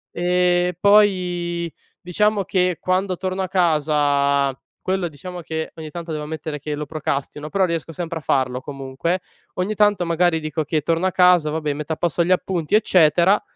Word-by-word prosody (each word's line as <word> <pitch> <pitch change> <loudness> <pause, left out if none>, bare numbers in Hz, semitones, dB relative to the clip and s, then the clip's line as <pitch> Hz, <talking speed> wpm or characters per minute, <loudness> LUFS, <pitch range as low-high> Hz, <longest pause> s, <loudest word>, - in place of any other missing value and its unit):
ehm, 180 0 +2
poi, 180 -5 +2 0.3
diciamo 205 +3 +1
che 180 -2 0
quando 185 0 0
torno 185 +1 -3
a 190 - -1
casa 145 -5 +2 0.2
quello 185 -2 -1
diciamo 175 +4 -8
che 160 -1 -4
ogni 160 -1 -8
tanto, 170 +1 -7
devo 150 -1 -4
ammettere 155 0 -5
che 150 +2 -5
lo 150 +1 -4
procrastino, 150 0 -4
però 195 +1 +2
riesco 170 -2 -3
sempre 165 0 -5
a - - -14
farlo 130 -3 0
comunque. 135 +6 -3 0.4
Ogni 185 +4 -1
tanto 205 -3 +3
magari 170 0 +2
dico 155 0 -3
che 155 +1 0
torno 165 +4 0
a - - 0
casa, 180 -4 +4
vabbè 150 -1 -2
metto 150 +2 -6
a 160 - -1
posto 170 0 0
gli 175 - -1
appunti, 180 -3 -1
eccetera 180 -2 +4
170 Hz, 175 wpm, -21 LUFS, 150-180 Hz, 0.4 s, casa